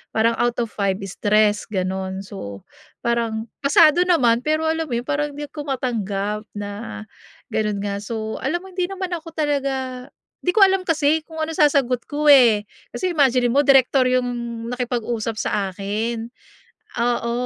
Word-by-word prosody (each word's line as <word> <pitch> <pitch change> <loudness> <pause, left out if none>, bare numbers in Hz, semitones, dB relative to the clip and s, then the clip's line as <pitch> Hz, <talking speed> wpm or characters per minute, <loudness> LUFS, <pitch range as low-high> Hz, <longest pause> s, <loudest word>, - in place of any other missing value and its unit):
Parang 225 +1 +3
out 240 0 +1
of 230 - -7
5 195 -2 0
is 195 - -8
3, 210 0 +2
ganon. 190 -1 -3
So 100 - -8 0.4
parang, 230 -1 -1
pasado 305 +4 +5
naman. 245 -10 +4
Pero 310 +1 +1
alam 320 0 0
mo 240 - -2
parang 290 +1 -2
hindi 295 - -5
ko 295 -1 -7
matanggap 210 -5 -2
na 205 +1 -6 0.5
ganon 210 -2 -1
nga. 200 -1 -2
So, 220 +1 -5
alam 345 +7 -2
mo 380 - -12
hindi 360 -1 -1
naman 380 -1 -5
ako 330 -1 -6
talaga 270 -4 -2 0.3
'di 360 - -1
ko 425 - +7
alam 380 -1 +3
kasi 310 -1 +2
kung 320 -1 -4
ano 315 - -3
sasagot 275 -6 +2
ko 295 0 +3
eh. 235 -6 +6 0.3
Kasi 370 -1 -1
imaginin 255 -6 +3
mo 280 - +3
direktor 270 -2 +4
yung 255 0 +1 0.4
nakipag-usap 240 -2 -2
sa - - -2 0.2
akin. 220 +4 -3 0.8
Oo, 235 0 0
245 Hz, 160 wpm, -22 LUFS, 215-295 Hz, 0.8 s, ko